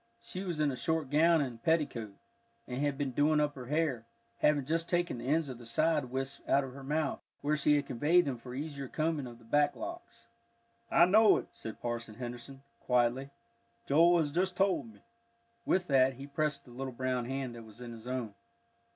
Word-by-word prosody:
She 190 -5 -6
was 175 -5 -3
in 150 -2 +2
a - - -4
short 155 +2 -1
gown 160 +2 +5
and 120 -5 -4
petticoat, 135 -11 0 0.5
and 125 +2 -3
had 145 -2 0
been 140 -2 -1
doing 150 +4 +3
up 150 -1 +1
her 125 -3 -9
hair, 145 -6 0 0.3
having 145 -3 +3
just 165 +3 -1
taken 175 -7 0
the 120 - -6
ends 155 +2 +2
of 125 -3 -7
the 120 - -11
side 155 +5 +2
wisps 135 +2 -4
out 140 - +4
of 130 -1 -7
her 140 0 -10
mouth, 150 +1 -1 0.2
where 150 +1 +1
she 150 0 +3
had 145 -1 +1
conveyed 150 +8 +3
them 130 -4 -3
for 125 +1 -9
the 135 +3 -2
easier 140 -3 -6
combing 155 -1 -1
of 120 -1 -10
the 115 - -19
back 145 +4 +2
locks. 340 -8 -8 0.6
"I 170 - +6
know 215 +3 +6
it," - - -6
said 110 - -8
Parson 115 -2 -4
Henderson, 125 +3 -8 0.2
quietly; 125 +2 +1 0.6
"Joel 170 +5 +5
has 155 -3 +1
just 180 +3 0
told 200 +4 +1
me." - - -20 0.7
With 185 -1 +2
that 135 -3 +4
he 135 +3 -8
pressed 145 +1 -2
the 125 - -14
little 130 +1 -5
brown 125 0 -1
hand 130 -1 -3
that 120 - -9
was 110 0 -14
in 120 -1 -7
his 115 0 -10
own. 125 -5 -3
140 Hz, 210 wpm, -32 LUFS, 125-160 Hz, 0.7 s, I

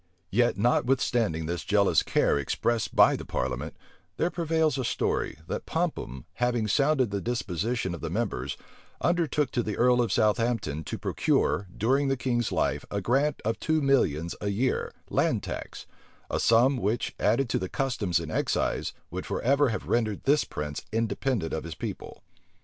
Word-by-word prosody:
Yet, 120 0 +2
notwithstanding 120 -6 +1
this 85 +2 -3
jealous 100 -1 +3
care - - +2
expressed 115 - -1
by - - +6
the - - -6
parliament, 65 0 -3 0.4
there 170 - +1
prevails 160 -3 +1
a - - 0
story, 120 - -1
that - - -5
Popham, 65 0 -2
having 120 -3 +1
sounded 135 0 +2
the 100 -1 -2
disposition 115 -3 -2
of 85 - -7
the 80 - -3
members, 85 - -2 0.4
undertook 160 -5 +1
to 120 - +1
the 105 -3 -3
earl 125 0 +4
of 120 - 0
Southampton 110 - +1
to - - -4
procure, 100 - +1
during 135 +6 +2
the 135 0 +1
king's 120 -2 0
life, - - 0
a 100 - -2
grant 135 +9 +1
of 110 0 -1
two 160 0 +1
millions 85 - +2
a 100 - -1
year, 115 +6 0 0.2
land - - +1
tax; - - -6 0.5
a - - 0
sum 120 +4 +4
which, 115 0 -1
added 120 +6 +2
to - - +1
the 95 - -4
customs 115 -10 0
and - - -6
excise, - - 0 0.2
would - - -5
forever 140 +2 +2
have 110 - -4
rendered 110 -4 0
this 145 +2 +3
prince 75 0 -5
independent 115 -3 -1
of 80 - -2
his 85 -1 -7
people. - - -7
115 Hz, 165 wpm, -27 LUFS, 95-130 Hz, 0.5 s, by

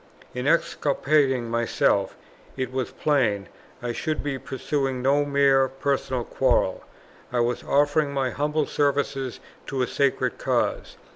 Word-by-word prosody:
In 125 +2 -3
exculpating 140 -5 +2
myself, 115 0 +1 0.4
it 130 -2 -2
was 130 -2 -1
plain 115 -10 +1 0.4
I 120 - -1
should 155 +6 -2
be 140 -2 -3
pursuing 135 -1 -2
no 140 +2 +3
mere 140 -2 +4
personal 135 -2 -1
quarrel; 120 -7 +1 0.5
I 125 - 0
was 120 +1 0
offering 145 +1 +2
my 135 -2 -1
humble 150 +4 0
service 140 -2 -1 0.3
to 135 -2 -1
a - - +2
sacred 140 -2 0
cause. - - -1
135 Hz, 130 wpm, -25 LUFS, 125-145 Hz, 0.5 s, mere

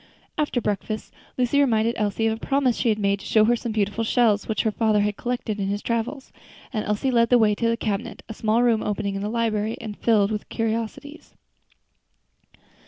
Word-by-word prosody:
After 295 -4 0
breakfast 215 0 -3 0.2
Lucy 255 +3 +2
reminded 230 -4 +3
Elsie 210 +1 -1
of 220 0 +1
a 225 - -14
promise 270 -3 +2
she 240 - 0
had 215 - +2
made 200 -1 +1
to 195 - -11
show 215 -1 +4
her 240 +2 +3
some 235 0 -4
beautiful 210 +1 -1
shells 220 -2 +2
which 220 - 0
her 220 - +1
father 215 -1 +2
had 205 0 0
collected 240 -3 -3
in 195 - -1
his 205 +1 -2
travels, 235 +4 -3 0.4
and 215 -2 -1
Elsie 210 +6 0
led 235 -2 +3
the 245 - +6
way 215 -2 +4
to 230 +2 0
the 230 - 0
cabinet, 210 -1 -3
a 220 - -6
small 220 +2 +1
room 230 -3 +3
opening 205 -1 -2
into 195 +1 -3
the - - -4
library, 225 -2 -1
and 210 -2 -6
filled 210 -2 +2
with 210 -1 -4
curiosities. 230 +6 -4
220 Hz, 205 wpm, -24 LUFS, 210-235 Hz, 0.4 s, the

